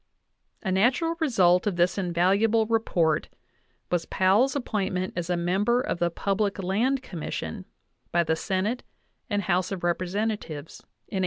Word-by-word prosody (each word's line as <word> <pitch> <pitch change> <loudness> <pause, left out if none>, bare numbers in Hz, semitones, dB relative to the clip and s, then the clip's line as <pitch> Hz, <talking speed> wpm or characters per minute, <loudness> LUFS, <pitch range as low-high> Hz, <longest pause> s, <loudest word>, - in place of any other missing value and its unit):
A 190 - -1
natural 250 - +2
result 190 - +3
of 200 - 0
this 175 +1 +2
invaluable 195 +5 +2
report 175 -9 +1 0.6
was 175 -2 0
Powell's 205 +9 +3
appointment 195 -8 -2
as 175 -1 -3
a 175 - +1
member 195 +8 +1
of 215 - -2
the 175 - +2
Public 200 +3 -1
Land 225 +8 0
Commission 170 -10 -5 0.5
by 170 0 +3
the 160 -1 +1
Senate 195 +7 -1 0.5
and 205 -2 0
House 185 0 0
of 190 -3 -4
Representatives 175 -3 -2 0.3
in 195 - -4
1879. - - +1
190 Hz, 145 wpm, -26 LUFS, 175-220 Hz, 0.6 s, result